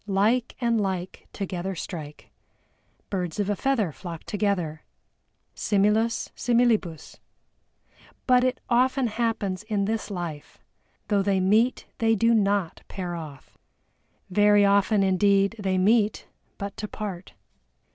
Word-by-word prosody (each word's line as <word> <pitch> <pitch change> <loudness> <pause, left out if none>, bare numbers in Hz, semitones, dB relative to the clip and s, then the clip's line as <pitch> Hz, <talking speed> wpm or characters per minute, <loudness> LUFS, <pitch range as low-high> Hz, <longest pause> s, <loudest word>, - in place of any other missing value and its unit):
Like 215 +5 +1
and 235 -3 +1
like 185 -2 -4
together 190 -1 -4
strike. 155 -4 -8 0.8
Birds 180 -2 -3
of 205 0 0
a - - 0
feather 235 -8 0
flock 165 +2 -8
together. 190 -7 -1 0.7
Similis 210 +3 +1
similibus. 230 -9 0 1.1
But 250 -1 +4
it 255 0 0
often 260 +2 +2
happens 215 -5 -1
in 210 -2 -1
this 220 +1 -2
life, 170 -6 -6 0.5
though 205 -2 +3
they 195 -1 +1
meet 215 +7 +2
they 225 -1 +3
do 230 +3 +3
not 200 -5 +1
pair 180 -2 -5
off. 155 -5 -9 0.7
Very 205 +1 +5
often 200 +1 +3
indeed 195 +2 +3
they 190 -2 0
meet, 210 +2 +2 0.3
but 200 0 -5
to 210 - -4
part. 195 -4 -6
200 Hz, 120 wpm, -25 LUFS, 185-225 Hz, 1.1 s, Very